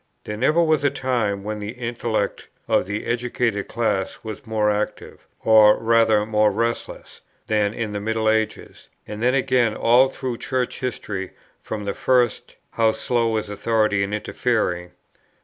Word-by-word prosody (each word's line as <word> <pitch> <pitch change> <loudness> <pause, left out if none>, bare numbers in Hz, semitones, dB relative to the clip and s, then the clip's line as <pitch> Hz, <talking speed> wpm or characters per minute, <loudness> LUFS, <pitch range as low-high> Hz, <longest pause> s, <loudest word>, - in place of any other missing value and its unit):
There 105 - -5
never 155 +9 +3
was 155 -3 +2
a 140 - +4
time 120 -8 -1
when 105 +1 -4
the 105 +2 -5
intellect 115 -4 -3 0.2
of - - +2
the 105 +1 -4
educated 120 -3 -1
class 105 -4 -1
was 110 +3 -8
more 105 -1 +1
active, 105 +1 -4
or 110 -1 +6
rather 115 -2 +3
more 105 -1 +3
restless, 115 +3 -4 0.2
than 105 -1 0
in 110 -2 -3
the 105 - -3
middle 110 +1 -1
ages. 110 0 -1 0.2
And 105 0 -7
then 125 +2 +2
again 130 -4 +2
all 125 +3 +4
through 130 -3 -5
Church 130 -2 -2
history 105 -7 -4 0.3
from 105 -2 -6
the 100 - -2
first, 125 -3 +1 0.2
how 110 -1 +2
slow 115 -2 0
is 110 - -3
authority 105 0 +1
in 100 +1 -1
interfering! 105 -5 -1
110 Hz, 155 wpm, -22 LUFS, 105-120 Hz, 0.3 s, or